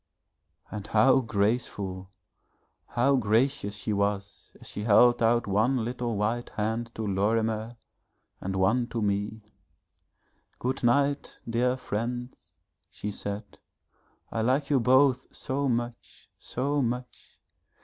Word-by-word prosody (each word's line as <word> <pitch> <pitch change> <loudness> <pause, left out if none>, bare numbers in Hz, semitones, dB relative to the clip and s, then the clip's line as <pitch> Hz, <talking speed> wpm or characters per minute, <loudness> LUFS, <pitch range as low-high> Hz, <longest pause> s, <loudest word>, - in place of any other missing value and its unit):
And 105 -1 -6
how 110 +6 +5
graceful, 100 -4 -1 0.8
how 135 +3 +2
gracious 115 -1 +1
she 100 +2 -2
was 100 0 -2
as - - -14
she 105 - -5
held 120 +3 +5
out 120 +1 +3
one 110 +5 +1
little 120 -1 -2
white 115 +4 -1
hand 110 +2 -1
to 110 - -4
Lorimer 110 +3 0 0.6
and 95 +1 -3
one 110 +6 +2
to 115 -2 -3
me. 105 +2 -1 1.1
'Good 130 +2 -2
night, 140 +4 +1
dear 125 +2 +1
friends,' 120 +2 -5 0.4
she 105 - -5
said, 100 +1 -6 0.7
'I 115 - -1
like 130 +5 +1
you 140 - +4
both 130 +1 +4
so 140 0 -1
much 120 0 -4
so 140 +3 -1
much. 125 0 -4
115 Hz, 120 wpm, -28 LUFS, 105-125 Hz, 1.1 s, how